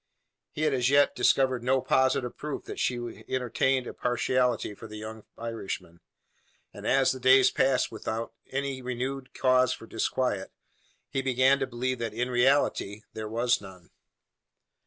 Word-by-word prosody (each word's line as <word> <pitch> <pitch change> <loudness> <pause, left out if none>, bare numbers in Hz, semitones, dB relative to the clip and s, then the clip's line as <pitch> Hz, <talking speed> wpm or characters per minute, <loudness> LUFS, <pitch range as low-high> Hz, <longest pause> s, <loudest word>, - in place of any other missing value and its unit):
He 155 - -4
had 155 -2 +2
as 125 -1 +2
yet 140 +1 +4
discovered 130 -3 +2
no 130 +2 +3
positive 130 -1 +1
proof 150 -1 -5
that - - -7
she 120 -1 -2
entertained 130 +1 +1
a - - -6
partiality 125 -2 0
for 110 - -11
the 105 0 -9
young 110 0 -8
Irishman; 110 -7 -6 0.7
and - - -7
as 135 0 +4
the 130 - -5
days 130 +1 +6
passed 130 -1 +2
without 110 +1 -4 0.2
any 135 -1 -3
renewed 130 +2 -4
cause 130 -1 +3
for - - -10
disquiet, 115 -3 -1 0.6
he 135 - -2
began 130 +1 +3
to 135 - -1
believe 130 +1 -2
that 115 -2 -4
in 125 +2 -1
reality 120 -5 +2
there 110 -1 -5
was 120 +1 +1
none. 95 -3 -13
125 Hz, 155 wpm, -28 LUFS, 115-130 Hz, 0.7 s, days